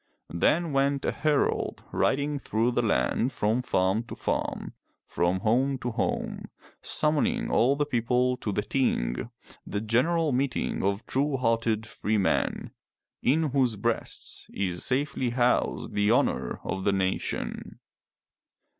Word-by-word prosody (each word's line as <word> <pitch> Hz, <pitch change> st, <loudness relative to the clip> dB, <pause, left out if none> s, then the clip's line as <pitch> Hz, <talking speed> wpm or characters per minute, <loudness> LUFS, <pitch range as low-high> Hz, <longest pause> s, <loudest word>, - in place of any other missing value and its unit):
Then 160 Hz, -, +2 dB
went 140 Hz, 0 st, +1 dB
a -, -, +1 dB
herald 150 Hz, -2 st, 0 dB
riding 145 Hz, +1 st, +1 dB
through 115 Hz, -1 st, 0 dB
the 120 Hz, -, +1 dB
land 120 Hz, +2 st, +1 dB
from 110 Hz, +2 st, 0 dB
farm 95 Hz, -3 st, +1 dB
to -, -, -8 dB
farm, -, -, -3 dB, 0.3 s
from 90 Hz, +2 st, 0 dB
home 130 Hz, +6 st, +2 dB
to 120 Hz, -1 st, -3 dB
home, -, -, -2 dB, 0.4 s
summoning 225 Hz, +10 st, +1 dB
all 130 Hz, +4 st, +4 dB
the 145 Hz, +1 st, 0 dB
people 125 Hz, -1 st, +1 dB
to 105 Hz, -, -3 dB
the 105 Hz, +1 st, -1 dB
Ting, 105 Hz, -, 0 dB, 0.3 s
the 100 Hz, -, -3 dB
genera] 145 Hz, +9 st, +2 dB
meeting 130 Hz, +1 st, -1 dB
of 100 Hz, +2 st, -1 dB
true 140 Hz, +1 st, 0 dB
hearted 115 Hz, -2 st, +1 dB
free 110 Hz, -1 st, -1 dB
men, 95 Hz, -, 0 dB, 0.5 s
in 150 Hz, +3 st, +2 dB
whose 130 Hz, -4 st, +2 dB
breasts 115 Hz, +3 st, -3 dB
is 90 Hz, -3 st, -2 dB
safely 130 Hz, -1 st, 0 dB
housed 120 Hz, +1 st, +1 dB
the 105 Hz, 0 st, +2 dB
honor 120 Hz, -, +1 dB
of 95 Hz, 0 st, -3 dB
the 100 Hz, -, +2 dB
nation. 95 Hz, -1 st, -2 dB
120 Hz, 135 wpm, -27 LUFS, 105-140 Hz, 0.5 s, all